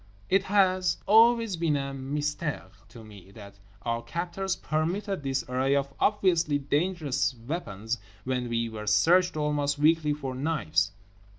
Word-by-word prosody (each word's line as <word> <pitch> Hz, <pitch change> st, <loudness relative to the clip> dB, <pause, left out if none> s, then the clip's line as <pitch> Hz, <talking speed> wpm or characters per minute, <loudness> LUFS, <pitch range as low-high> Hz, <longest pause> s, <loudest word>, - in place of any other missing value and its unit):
It 195 Hz, +1 st, +3 dB
has 185 Hz, -3 st, +2 dB
always 225 Hz, -1 st, +5 dB
been 165 Hz, -3 st, +1 dB
a 140 Hz, 0 st, -4 dB
mystère 145 Hz, -, -3 dB, 0.2 s
to 115 Hz, -, -12 dB
me 100 Hz, -4 st, -14 dB
that 100 Hz, -2 st, -12 dB, 0.2 s
our 115 Hz, 0 st, -1 dB
captors 180 Hz, +5 st, -3 dB
permitted 180 Hz, +5 st, -2 dB
this 135 Hz, -1 st, -1 dB
array 130 Hz, +2 st, +1 dB
of 140 Hz, 0 st, -1 dB
obviously 175 Hz, -7 st, +2 dB
dangerous 145 Hz, -1 st, -1 dB
weapons 115 Hz, -, -4 dB, 0.2 s
when 125 Hz, -2 st, -2 dB
we 115 Hz, 0 st, 0 dB
were 110 Hz, -1 st, -7 dB
searched 170 Hz, -, +4 dB
almost 145 Hz, -1 st, 0 dB
weekly 155 Hz, 0 st, +3 dB
for 135 Hz, -3 st, -5 dB
knives. 125 Hz, -, 0 dB
145 Hz, 135 wpm, -27 LUFS, 125-175 Hz, 0.2 s, always